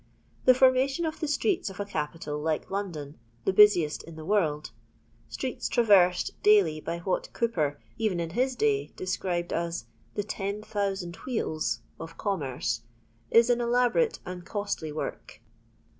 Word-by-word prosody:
The 255 - +7
formation 265 +5 +3
of 315 -1 -3
the 310 - -2
streets 345 - 0
of 195 - -11
a 205 - -1
capital 150 -4 -4
like 155 +3 -2
London, 165 -9 -4 0.3
the 190 - +2
busiest 185 -7 +5
in 165 - -11
the 155 0 -8
world 155 - 0 0.3
— 115 0 -34
streets 255 -2 -3
traversed 190 -6 +4
daily 195 -7 +5
by 170 +2 -3
what 180 +2 -2
Cowper, 155 -12 0 0.2
even 210 -6 0
in 165 -1 -3
his 255 +6 0
day, 425 - +1
described 180 -2 -2
as 170 -5 -2 0.3
"the 205 - -1
ten 200 0 -4
thousand 195 -5 -2
wheels" 155 - -2 0.2
of 165 +1 -8
commerce 135 - -2 0.3
— 115 +1 -36
^ii 230 +1 +6
an 240 - +2
eUborate 245 - +2
and 180 -1 -6
costly 205 -6 -3
work. 155 - -6
190 Hz, 155 wpm, -28 LUFS, 160-230 Hz, 0.3 s, The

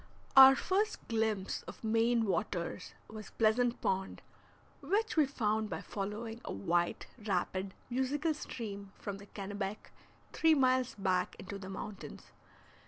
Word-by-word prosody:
Our 270 0 +11
first 410 +8 -1
glimpse 220 -4 0
of - - -10
Maine 225 +1 +2
waters 190 -4 -2
was 215 -2 -9
Pleasant 235 +2 +2
Pond, 190 0 -1 0.6
which 435 +2 0
we 305 -4 +4
found 220 -5 0
by - - -4
following 215 +3 -5
a - - -5
white, 170 - 0 0.2
rapid, 190 -1 -1
musical 275 +6 0
stream 200 -8 -7
from 200 -1 -5
the 200 - -12
Kennebec 200 0 -5 0.4
three 320 -1 +4
miles 255 -2 +2
back 185 -2 0
into 200 +1 -7
the 190 -1 -8
mountains. 195 +1 -8
215 Hz, 130 wpm, -33 LUFS, 195-255 Hz, 0.6 s, Our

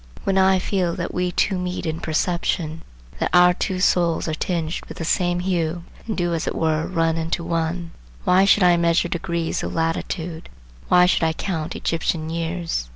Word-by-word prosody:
When 195 - 0
I 190 0 +5
feel 180 -2 -1
that 175 - -4
we 180 0 0
two 190 +1 +1
meet 180 0 -3
in 160 0 -2
a - - -14
perception, 160 0 -1 0.4
that - - 0
our 180 0 +7
two 185 0 -2
souls 175 -2 +2
are 155 - -1
tinged 165 0 -2
with - - -8
the 165 - -4
same 175 +1 +1
hue, 175 -2 -1 0.2
and 220 - -3
do 175 -1 0
as 165 - -2
it - - -2
were 160 -1 0
run 165 -2 +1
into 165 +1 -2
one, 165 0 -2 0.3
why 185 +2 +4
should 200 0 +5
I 175 -1 +5
measure 170 +1 +2
degrees 170 -1 -2
of - - -4
latitude, 165 0 -2 0.4
why 180 0 +6
should 180 - +2
I 160 0 +2
count 160 -2 -3
Egyptian 160 -1 -1
years? 165 - -3
170 Hz, 190 wpm, -22 LUFS, 165-180 Hz, 0.4 s, our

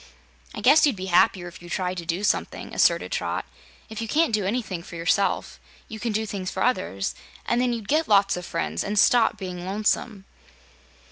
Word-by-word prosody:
"I - - -5
guess 285 +5 +6
you'd 275 - 0
be 185 -1 -6
happier 175 0 +4
if 175 0 -12
you 175 - -11
tried 185 0 -2
to 170 -1 -6
do 175 +4 -2
something," 210 - -1
asserted - - +2
Trot. - - -2 0.4
"If 220 0 -7
you 225 - -3
can't 305 0 +2
do 210 -3 +1
anything 195 -5 -2
for 170 - -11
yourself, 170 +4 0 0.3
you 220 - -8
can 235 +1 -2
do 220 +1 -1
things 195 -3 -4
for - - -2
others, 185 - -1 0.3
and 240 +1 +1
then 250 -1 +1
you'd 230 -4 -4
get 310 +2 +1
lots 200 -2 +4
of 180 - -6
friends 80 - -3
and 210 - -3
stop 235 +2 +4
being 180 -2 -6
lonesome." 205 +1 -1
200 Hz, 200 wpm, -24 LUFS, 180-225 Hz, 0.4 s, guess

